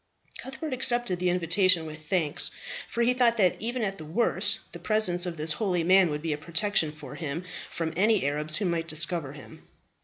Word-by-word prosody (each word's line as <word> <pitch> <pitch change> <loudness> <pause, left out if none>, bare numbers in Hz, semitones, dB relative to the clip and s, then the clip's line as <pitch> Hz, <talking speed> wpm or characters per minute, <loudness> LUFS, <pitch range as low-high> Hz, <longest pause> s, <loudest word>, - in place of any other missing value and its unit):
Cuthbert 265 +2 -6
accepted 240 -7 +1
the 180 0 +1
invitation 180 0 +3
with 155 0 -10
thanks; 160 -6 +1 0.4
for 235 - -1
he 245 +2 +3
thought 240 -2 +2
that 185 -4 +3
even 240 +2 -3
at 195 -3 -3
the - - -7
worst 175 +10 +1
the - - -9
presence 185 -5 +2
of 170 -2 -5
this 155 0 +1
holy 180 -1 -1
man 185 +1 +5
would 150 0 -4
be 160 -2 -1
a 150 - -5
protection 170 0 0
to 150 - -12
him 160 +1 -5 0.3
from 165 -1 -4
any 210 -1 +2
Arabs 150 +2 -1
who 205 - -1
might 170 -2 -1
discover 165 -3 -1
him. 145 - -13
175 Hz, 195 wpm, -27 LUFS, 155-215 Hz, 0.4 s, man